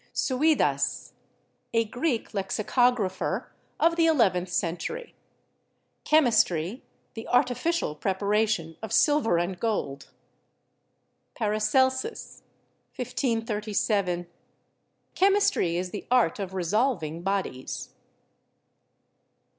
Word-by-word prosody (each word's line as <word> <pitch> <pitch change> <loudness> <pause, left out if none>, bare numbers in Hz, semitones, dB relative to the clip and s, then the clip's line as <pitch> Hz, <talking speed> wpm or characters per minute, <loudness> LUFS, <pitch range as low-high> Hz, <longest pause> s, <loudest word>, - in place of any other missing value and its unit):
Suidas 295 +4 +1 0.6
(a 230 0 +3
Greek 245 +2 -2
lexicographer 205 +1 0 0.3
of 335 0 +3
the 330 -1 +4
eleventh 190 - +2
cen 170 -1 -1
tury). 475 - -6 0.9
"Chemistry, 230 - +2 0.3
the 225 - -8
artificial 250 - +1
preparation 200 -2 0
of 220 -2 -6
silver 240 - +3
and 175 +2 -2
gold." 140 -12 -2 1.3
Paracelsus 260 - 0 0.5
(1537 215 -6 -1
[?])• - - -23 0.9
"Chemistry 390 - +2
is 180 0 -3
the 205 - -7
art 245 -9 +3
of 190 -1 -5
resolving 180 - 0
bodies." 190 -9 -3
215 Hz, 85 wpm, -26 LUFS, 185-255 Hz, 1.3 s, the